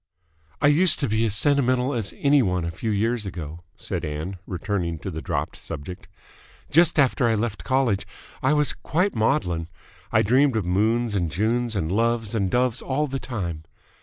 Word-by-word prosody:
"I - - +3
used 160 +5 +6
to 140 - +1
be 110 +1 +1
as 105 -2 0
sentimental 130 0 +2
as 115 -6 -2
any 140 -1 +4
one 90 -6 0
a 85 - -3
few 110 +7 -4
years 110 +1 0
ago," 85 -3 -7 0.2
said - - -4
Ann, 80 +5 -4
returning 90 -3 -2
to 95 +5 -6
the 80 -1 -5
dropped - - -3
subject. 90 +6 -8 0.6
"Just 170 +2 +4
after 135 -3 +3
I 115 - +2
left 110 0 -2
college, 130 -7 +1 0.3
I 130 +3 +3
was 150 -1 +2
quite 180 +5 -1
maudlin. 95 - 0 0.4
I - - +4
dreamed 130 +4 +3
of 110 -5 0
moons 110 +5 +1
and 90 -5 0
Junes 115 +5 0
and 80 -4 -1
loves 115 +1 0
and 100 -4 0
doves 125 +2 +1
all 140 +3 -1
the 135 -1 -4
time. 85 -12 -5
115 Hz, 180 wpm, -24 LUFS, 95-130 Hz, 0.6 s, used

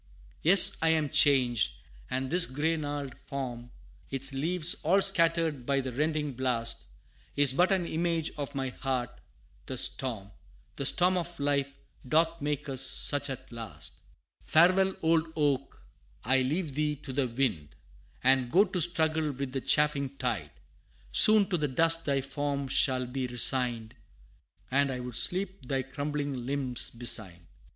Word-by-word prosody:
Yes 195 +3 +8
I 165 - +2
am 155 -2 +1
changed 125 - +3 0.4
and 130 0 -3
this 175 0 +4
gray 150 +5 -1
gnarled 145 -3 -5
form, 125 -3 -6 0.4
Its 135 +1 -2
leaves 165 +5 +1
all 185 +6 +2
scattered 165 -7 +3
by 140 +2 0
the 130 -1 -4
rending 150 +2 -2
blast, 120 -2 -2 0.5
Is 145 -2 +5
but 180 +7 +2
an 185 -3 +1
image 165 -1 -2
of 145 -1 -6
my 135 -1 -3
heart; 125 -2 -4 0.6
the - - -6
storm 110 -7 0 0.4
The 140 - 0
storm 185 +1 +3
of 175 -1 -5
life, 140 -1 -1 0.4
doth 165 +3 +1
make 150 +1 -3
us 135 -2 -2
such 145 +1 +2
at 130 -2 -8
last! 115 -2 -8 0.4
Farewell, 185 +4 +3
old 160 0 +1
oak! 140 -3 -2 0.4
I 130 +2 +2
leave 150 +3 -2
thee 150 +1 -1
to 135 -1 -10
the 135 -1 0
wind, 115 - -3 0.5
And 130 -1 +2
go 190 +9 +4
to 185 -2 -3
struggle 160 -2 +1
with 135 -1 -6
the 135 0 -4
chafing 140 -2 0
tide - - -3 0.6
Soon 215 -3 +7
to 180 - 0
the 150 -2 -1
dust 165 +4 +1
thy 140 -2 0
form 140 0 -4
shall 130 -1 +1
be 130 +1 -4
resigned, 120 -2 0 0.8
And 140 +1 +2
I 130 -1 -4
would 125 -1 -7
sleep 185 +1 -2
thy 135 0 -2
crumbling 145 -1 -5
limbs 135 -3 -1
beside. 110 -7 -1
140 Hz, 150 wpm, -28 LUFS, 130-160 Hz, 0.8 s, Yes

